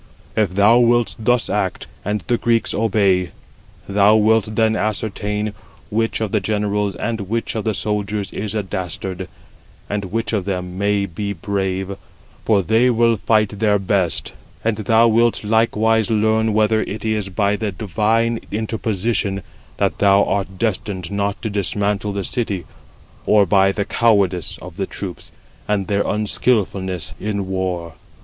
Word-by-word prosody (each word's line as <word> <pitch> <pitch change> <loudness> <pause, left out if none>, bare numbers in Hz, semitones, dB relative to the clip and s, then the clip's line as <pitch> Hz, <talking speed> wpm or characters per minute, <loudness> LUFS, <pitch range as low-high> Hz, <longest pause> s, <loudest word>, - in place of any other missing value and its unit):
If 100 -4 +1
thou 105 +4 +6
wilt 120 -1 +3
thus 120 +1 +2
act, - - -1 0.2
and 105 0 -1
the 120 +6 +1
Greeks 115 -1 +1
obey, 100 -5 +2 0.6
thou 100 +2 +4
wilt 110 0 +3
then 110 0 +3
ascertain 105 0 -2 0.4
which 115 +1 0
of 110 -3 -1
the 110 - +2
generals 105 0 -1
and 115 -2 -3
which 115 +1 -1
of 110 -1 -3
the 110 -2 0
soldiers 105 0 -2
is 105 0 -3
a 105 - 0
dastard, 95 0 -4 0.6
and 100 -1 -2
which 115 +5 -2
of 100 -4 0
them 90 -2 -3
may 100 +1 +1
be 100 +3 -4
brave, 95 +1 -2 0.5
for 105 -3 +3
they 115 +6 +3
will 115 -1 +3
fight 105 -1 +1
their 105 -2 +3
best, 95 -4 0 0.3
109 - - -23
and 110 - -1
thou 115 +1 +5
wilt 115 0 +2
likewise 110 0 +2
learn 110 0 +2
whether 110 0 +3
it 110 +1 -5
is 105 -3 -1
by 100 +2 +1
the 105 -1 -2
divine 110 +5 0
interposition 110 -2 -1 0.3
that - - 0
thou 100 0 +5
art 95 -1 -2
destined 95 -4 -2
not 100 0 -1
to 110 - -1
dismantle 100 0 0
the 100 0 -3
city, 100 -6 -2 0.6
or 105 -1 +5
by 95 +1 +4
the 100 0 -2
cowardice 100 -7 +1
of 90 -1 -10
the 95 - -2
troops, 95 -3 -7 0.4
and 105 -2 0
their 100 +2 0
unskilfulness 100 -4 0
in 100 -2 -2
war." 90 -3 -3
105 Hz, 155 wpm, -20 LUFS, 95-110 Hz, 0.6 s, thou